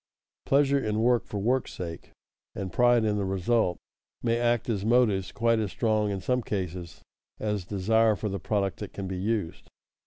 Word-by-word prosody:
Pleasure 140 0 +4
in 110 -4 -1
work 120 -3 +3
for 105 - -5
work's 125 +6 0
sake, 85 -2 -7 0.5
and 95 -3 -5
pride 120 -2 +4
in 105 -1 +1
the 100 - 0
result, 95 0 +1 0.5
may 115 0 +1
act 120 -1 +1
as 105 -5 -1
motives 110 -5 +2
quite 115 +2 +2
as 105 -2 -1
strong 110 -1 +1
in 100 -2 -3
some 125 +4 0
cases 90 -5 -5 0.4
as 105 -4 -2
desire 110 +3 +2
for 105 - -3
the 100 -1 -3
product 100 0 -1
that 105 - -7
can 100 - -5
be 95 0 -4
used. 95 -4 -2
105 Hz, 180 wpm, -27 LUFS, 95-115 Hz, 0.5 s, Pleasure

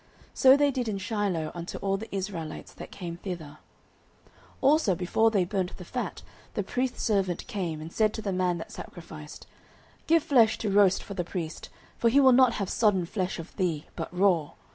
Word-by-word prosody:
So 265 +1 +7
they 285 0 +3
did 250 -3 -2
in 210 -2 -1
Shiloh 195 -6 -1
unto 170 0 -6
all 195 0 0
the 215 +3 -6
Israelites 185 -5 -5
that - - -9
came 170 -3 -7
thither. 165 -6 -7 0.7
09:002:015 - - -28 0.3
Also 275 - +4
before 190 +6 +2
they 200 -5 +2
burnt 185 -1 -2
the 180 - -9
fat, 250 +7 -4 0.3
the - - 0
priest's 250 0 -2
servant 195 -6 0
came, 175 -6 -3
and 160 +2 -8
said 215 -1 +3
to 220 - -4
the 200 -3 -1
man 180 -1 +1
that 165 - -8
sacrificed, 155 -3 -10 0.6
Give 330 -1 +4
flesh 245 -9 +4
to 210 - -2
roast 195 -1 +4
for 200 - -7
the 185 -2 -2
priest; 170 -2 -5 0.3
for 235 - +4
he 270 +5 +5
will 265 -2 +7
not 255 -1 +6
have 200 -4 -2
sodden 195 -4 +2
flesh 185 +1 -2
of 165 0 -9
thee, 170 -6 -1
but 165 - -4
raw. 180 -4 +2
195 Hz, 195 wpm, -28 LUFS, 175-225 Hz, 0.7 s, So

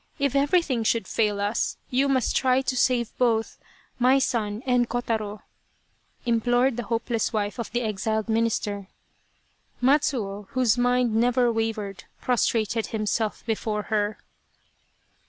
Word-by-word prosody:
If 280 -2 0
everything 280 -4 +2
should 220 -3 +1
fail 210 -2 0
us, 205 +3 -1
you 270 +2 +2
must 260 -2 +1
try 260 0 +3
to 260 - -1
save 245 -2 +1
both, 225 -3 +1 0.4
my 255 +2 +5
son 225 -4 -1
and 250 -2 +2
Kotaro," 220 -4 -2 0.8
implored 245 +2 +2
the 240 -1 -4
hopeless 230 0 -1
wife 210 +1 -2
of 235 - -3
the 245 - 0
exiled 220 +1 -1
minister. 220 -3 -1 0.9
Matsuo, 245 -7 +1
whose 255 -4 +3
mind 245 -1 +2
never 240 +2 +3
wavered, 220 -3 -3
prostrated 230 -2 0
him 215 -1 -3
self 215 0 -1
before 215 -1 -2
her. 210 0 0
230 Hz, 130 wpm, -25 LUFS, 215-250 Hz, 0.9 s, my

